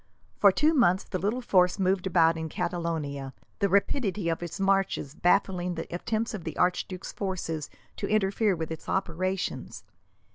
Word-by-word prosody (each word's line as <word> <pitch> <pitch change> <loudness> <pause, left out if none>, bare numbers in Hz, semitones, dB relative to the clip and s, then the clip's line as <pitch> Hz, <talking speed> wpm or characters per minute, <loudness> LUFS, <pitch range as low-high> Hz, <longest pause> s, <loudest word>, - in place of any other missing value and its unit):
For 200 - +7
two 300 - +3
months 195 - +4
the 185 - -4
little 215 +7 -1
force 180 -6 +3
moved 190 -1 +1
about 165 -2 +4
in 160 0 -4
Catalonia, 150 -6 -3 0.2
the 200 - +2
rapidity 200 -2 +1
of 165 - -1
its 175 +3 -6
marches 195 -7 +1
baffling 180 0 +1
the 165 - -4
attempts 220 +6 -2
of 200 -6 -5
the 160 -2 -6
archduke's 180 +1 0
forces 170 -6 -3 0.3
to - - -3
interfere 210 -1 +2
with 160 -1 -4
its 160 - -7
operations. 185 - -2
185 Hz, 155 wpm, -28 LUFS, 165-195 Hz, 0.3 s, For